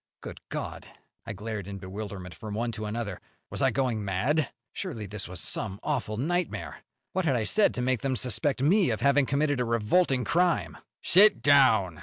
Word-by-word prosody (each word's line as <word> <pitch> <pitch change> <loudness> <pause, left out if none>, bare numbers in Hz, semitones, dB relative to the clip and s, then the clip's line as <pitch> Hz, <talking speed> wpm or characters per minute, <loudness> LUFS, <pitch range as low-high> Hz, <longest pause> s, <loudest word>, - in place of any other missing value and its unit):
Good - - -8
God! - - -5 0.4
I 110 - -3
glared 105 -1 -5
in 100 0 -6
bewilderment 95 -1 -7
from 105 -2 -7
one 115 +2 -1
to 110 -1 -5
another. 105 -3 -4 0.3
Was - - -4
I 135 - +4
going 125 -3 -1
mad? 115 - 0 0.2
Surely 145 - -5
this 105 0 -5
was 90 0 -7
some 100 +4 -3
awful 125 -8 -2
nightmare! 175 +7 -2 0.3
What 190 -1 0
had 135 -5 +2
I 115 - 0
said 205 - +3
to 125 - -2
make 130 -2 +1
them 135 -1 -1
suspect 125 +3 -1
me 185 +2 +4
of 110 -3 -2
having 140 -1 +3
committed 145 -1 +1
a - - +2
revolting 125 +5 +2
crime? 175 +3 +1 0.2
"Sit 205 +4 +6
down!" 110 - +4
120 Hz, 185 wpm, -27 LUFS, 105-145 Hz, 0.4 s, Sit